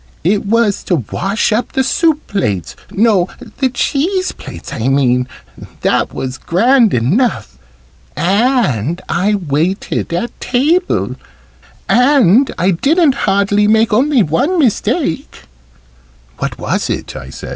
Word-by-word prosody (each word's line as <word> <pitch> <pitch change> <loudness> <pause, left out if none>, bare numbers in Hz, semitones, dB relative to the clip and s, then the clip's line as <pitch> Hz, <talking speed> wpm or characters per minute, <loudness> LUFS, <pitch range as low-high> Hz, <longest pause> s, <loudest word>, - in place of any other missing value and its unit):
"It 200 +4 0
was 225 -2 +1
to 180 - +1 0.2
wash 200 +4 -1
up 230 +3 -2
the 265 - +1
soup 310 +4 +1
plates 105 - -2
no, 205 -4 +2 0.3
the 265 -2 +2
cheese 355 +9 -1
plates - - -10
I 115 - -2
mean 125 -2 +2 0.5
that - - +1
was 130 0 -5
grand 230 +5 +3
enough. 185 - 0 0.6
And 175 - +1
I 195 +5 +1
waited 170 +2 -2
at 175 +8 -3
table. 310 +9 0 0.7
And 250 -2 +4
I 185 +3 +2
didn't 290 - +2 0.2
hardly 200 +1 +2
make 220 +1 +3
only 260 +1 +3
one 190 - 0
mistake." 265 - -1 1.0
"What - - -3
was - - -2
it?" - - -4
I 65 0 -8
said. - - -9
210 Hz, 125 wpm, -15 LUFS, 170-260 Hz, 1.0 s, And